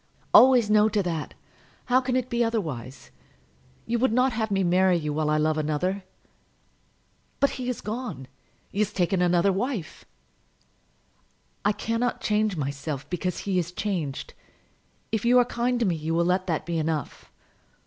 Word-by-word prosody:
"Always 250 Hz, -3 st, +7 dB
no 210 Hz, 0 st, +4 dB
to 210 Hz, -2 st, 0 dB
that. 165 Hz, -4 st, -4 dB, 0.5 s
How 255 Hz, +1 st, +3 dB
can 255 Hz, -1 st, -1 dB
it 255 Hz, -1 st, 0 dB
be 240 Hz, -1 st, 0 dB
otherwise? 150 Hz, -, -4 dB, 0.7 s
You 235 Hz, +1 st, -1 dB
would 260 Hz, -1 st, +2 dB
not 250 Hz, +2 st, +2 dB
have 220 Hz, -1 st, -1 dB
me 195 Hz, -1 st, +1 dB
marry 180 Hz, +1 st, +3 dB
you 150 Hz, -2 st, -3 dB
while 155 Hz, 0 st, 0 dB
I 150 Hz, -, +2 dB
love 155 Hz, 0 st, +1 dB
another!" 180 Hz, +6 st, -1 dB, 1.3 s
"But 280 Hz, -, +3 dB
he 255 Hz, -1 st, -4 dB
is 250 Hz, -, -3 dB
gone. 215 Hz, -, -5 dB, 0.4 s
He 200 Hz, -, -4 dB
has 210 Hz, -1 st, +1 dB
taken 185 Hz, -1 st, 0 dB
another 180 Hz, +2 st, +3 dB
wife." 205 Hz, -, -4 dB, 1.6 s
"I 205 Hz, -, +3 dB
cannot 230 Hz, +3 st, -2 dB
change 210 Hz, -3 st, 0 dB
myself 140 Hz, 0 st, -4 dB
because 180 Hz, +1 st, -2 dB
he 190 Hz, -2 st, 0 dB
is 175 Hz, 0 st, -3 dB
changed. 175 Hz, -8 st, -3 dB, 0.8 s
If 220 Hz, -2 st, -1 dB
you 245 Hz, +1 st, +5 dB
are 245 Hz, -, +5 dB
kind 245 Hz, 0 st, -1 dB
to 235 Hz, -, +1 dB
me 180 Hz, -4 st, +1 dB
you 160 Hz, +1 st, -2 dB
will 170 Hz, 0 st, +2 dB
let 185 Hz, +1 st, +1 dB
that 160 Hz, -4 st, -1 dB
be 170 Hz, -1 st, -2 dB
enough." 155 Hz, -1 st, -3 dB
195 Hz, 165 wpm, -26 LUFS, 160-230 Hz, 1.6 s, Always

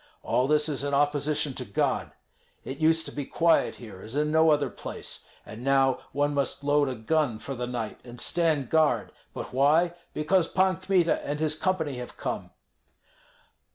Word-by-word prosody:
All 125 Hz, -, +1 dB
this 150 Hz, +1 st, +3 dB
is 140 Hz, -3 st, -1 dB
in 140 Hz, -1 st, 0 dB
opposition 145 Hz, 0 st, +1 dB
to -, -, -4 dB
God. -, -, -1 dB, 0.5 s
It 135 Hz, -, -6 dB
used 160 Hz, +1 st, +3 dB
to -, -, -6 dB
be 145 Hz, -, -4 dB
quiet 165 Hz, +4 st, +2 dB
here 105 Hz, -6 st, -11 dB
as 110 Hz, +6 st, -8 dB
in 150 Hz, +1 st, +1 dB
no 160 Hz, +1 st, +5 dB
other 145 Hz, -2 st, +2 dB
place, -, -, -6 dB, 0.2 s
and 110 Hz, +3 st, -9 dB
now 135 Hz, -1 st, +3 dB
one 145 Hz, +1 st, 0 dB
must 140 Hz, 0 st, -1 dB
load 145 Hz, -1 st, +3 dB
a 130 Hz, -, -3 dB
gun 130 Hz, +1 st, 0 dB
for 135 Hz, -, -6 dB
the 125 Hz, -1 st, -4 dB
night 120 Hz, -3 st, -4 dB
and 120 Hz, -1 st, -11 dB
stand 160 Hz, -6 st, +1 dB
guard; 160 Hz, -1 st, +2 dB, 0.2 s
but -, -, -7 dB
why? 155 Hz, +6 st, +3 dB, 0.2 s
Because 165 Hz, +3 st, +2 dB
Pan 185 Hz, -1 st, +2 dB
Kmita 185 Hz, -3 st, +1 dB
and 145 Hz, +1 st, -3 dB
his 155 Hz, -1 st, +1 dB
company 160 Hz, -6 st, -1 dB
have 125 Hz, 0 st, -8 dB
come." -, -, -4 dB
145 Hz, 180 wpm, -27 LUFS, 135-160 Hz, 0.5 s, no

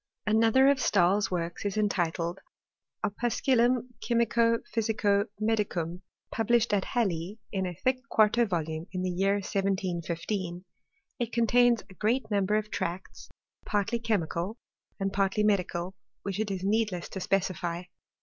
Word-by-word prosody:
4nother 225 Hz, +5 st, +5 dB
of 280 Hz, -1 st, 0 dB
Stahl's 195 Hz, 0 st, +3 dB
works 170 Hz, -1 st, -3 dB
is 205 Hz, 0 st, -2 dB
entitled 175 Hz, -3 st, 0 dB, 0.3 s
" -, -, -9 dB
Opusculum 240 Hz, +3 st, +1 dB, 0.2 s
mico 235 Hz, -1 st, +3 dB, 0.2 s
pbysico 210 Hz, -2 st, +1 dB
medic 215 Hz, -3 st, 0 dB
um," 170 Hz, +2 st, -3 dB, 0.3 s
published 230 Hz, 0 st, +2 dB
at 200 Hz, -2 st, +2 dB
Halle 195 Hz, -4 st, -1 dB
in 190 Hz, -2 st, -1 dB
a 180 Hz, -, -5 dB
thick 255 Hz, 0 st, +2 dB
quarto 220 Hz, +2 st, +4 dB
volume, 160 Hz, -2 st, -3 dB
in 185 Hz, 0 st, -2 dB
the 185 Hz, -, 0 dB
year 195 Hz, +3 st, +2 dB
1 200 Hz, -, -3 dB
715. 185 Hz, -1 st, -2 dB, 0.5 s
It 240 Hz, -1 st, -2 dB
contains 240 Hz, 0 st, +3 dB
A 195 Hz, -, -14 dB
great 220 Hz, +4 st, 0 dB
number 200 Hz, 0 st, +2 dB
of 215 Hz, 0 st, -1 dB
tracts, 185 Hz, -1 st, -4 dB, 0.3 s
partly 210 Hz, +3 st, 0 dB
chemical 205 Hz, -2 st, -1 dB, 0.4 s
and 195 Hz, 0 st, -1 dB
partly 195 Hz, +1 st, +1 dB
medical, 185 Hz, -3 st, 0 dB, 0.3 s
which 200 Hz, 0 st, -3 dB
it 215 Hz, -1 st, -1 dB
is 190 Hz, -1 st, -3 dB
needless 205 Hz, -3 st, 0 dB
to 190 Hz, -, -5 dB
specify. 180 Hz, -3 st, -1 dB
200 Hz, 140 wpm, -29 LUFS, 180-225 Hz, 0.5 s, 4nother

